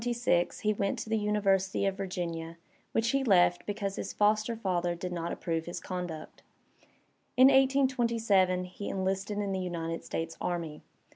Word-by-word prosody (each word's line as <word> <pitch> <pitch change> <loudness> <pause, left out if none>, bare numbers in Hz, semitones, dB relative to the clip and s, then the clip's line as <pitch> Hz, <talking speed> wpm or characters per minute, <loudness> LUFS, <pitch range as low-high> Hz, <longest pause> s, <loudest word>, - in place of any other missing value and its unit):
In - - -6
1826 235 -8 +1
he 215 0 +2
went 200 +5 -1
to 225 -1 -6
the 220 - +2
University 200 -2 +1
of 195 -1 0
Vir 195 -1 -3
ginia, 170 -2 -4 0.4
which 230 +1 +1
he 275 0 +1
left 180 -6 +3
because 200 -1 -3
his - - -4
foster 215 +2 +2
father 175 -5 -1
did 180 +1 -5
not 170 -1 -3
approve 165 -1 -2
his 175 - -4
conduct. 175 -4 -6 1.0
In 260 +1 +9
1827 235 -9 +3
he 180 +3 -7
enlisted 195 +2 -2
in 205 -1 -1
the 190 - -1
United 165 -2 -3
States 165 0 -4
Army. 170 -4 -3
195 Hz, 165 wpm, -30 LUFS, 175-220 Hz, 1.0 s, In